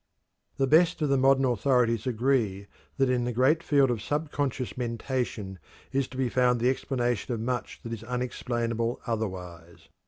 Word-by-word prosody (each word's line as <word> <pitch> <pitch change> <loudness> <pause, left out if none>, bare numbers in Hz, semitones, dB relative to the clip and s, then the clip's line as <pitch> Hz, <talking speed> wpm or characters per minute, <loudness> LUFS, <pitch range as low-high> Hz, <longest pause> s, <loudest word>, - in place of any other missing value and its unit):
The 135 - +2
best 165 +6 +4
of 150 - +1
the 140 - +3
modern 135 0 +4
authorities 120 -2 +2
agree 115 -5 0 0.3
that 135 -1 +3
in 125 -1 +1
the 120 - -1
great 130 +7 +3
field 140 -5 +3
of 115 -4 -2
subconscious 145 -2 -2
mentation 115 -5 -3 0.3
is 135 -1 0
to 130 - -10
be 130 -1 +1
found 125 0 +2
the 125 +2 +3
explanation 120 -2 -1
of - - -5
much 125 +2 -3
that 115 - -5
is 115 -1 -6
unexplainable 120 -1 -2
otherwise. 90 -7 -5
125 Hz, 160 wpm, -27 LUFS, 115-135 Hz, 0.3 s, best